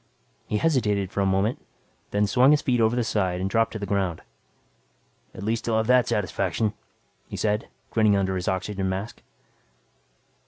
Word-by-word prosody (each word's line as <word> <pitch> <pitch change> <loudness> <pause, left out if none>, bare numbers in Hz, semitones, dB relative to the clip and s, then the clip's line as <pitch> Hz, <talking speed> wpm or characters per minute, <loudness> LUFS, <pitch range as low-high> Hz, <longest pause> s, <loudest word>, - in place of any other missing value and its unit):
He 105 - 0
hesitated 105 - +1
for 100 - -1
a 100 - +2
moment, 95 +5 0 0.5
then 105 +1 +1
swung 125 +6 +4
his 150 0 +4
feet 125 -3 +2
over 110 +1 +3
the 125 - +1
side 95 -5 0
and 95 - -1
dropped 115 +3 +1
to - - -3
the 100 - -4
ground. 95 -5 -1 1.1
"At 95 - -7
least 115 +2 -1
I'll 110 - +2
have 110 - +1
that 125 +1 +4
satisfaction," 105 0 -1 0.5
he - - -7
said, 105 0 0 0.2
grinning 110 -2 +3
under 95 -1 0
his 90 -1 -3
oxygen 95 +1 -1
mask. 95 +4 -5
105 Hz, 170 wpm, -25 LUFS, 95-115 Hz, 1.1 s, swung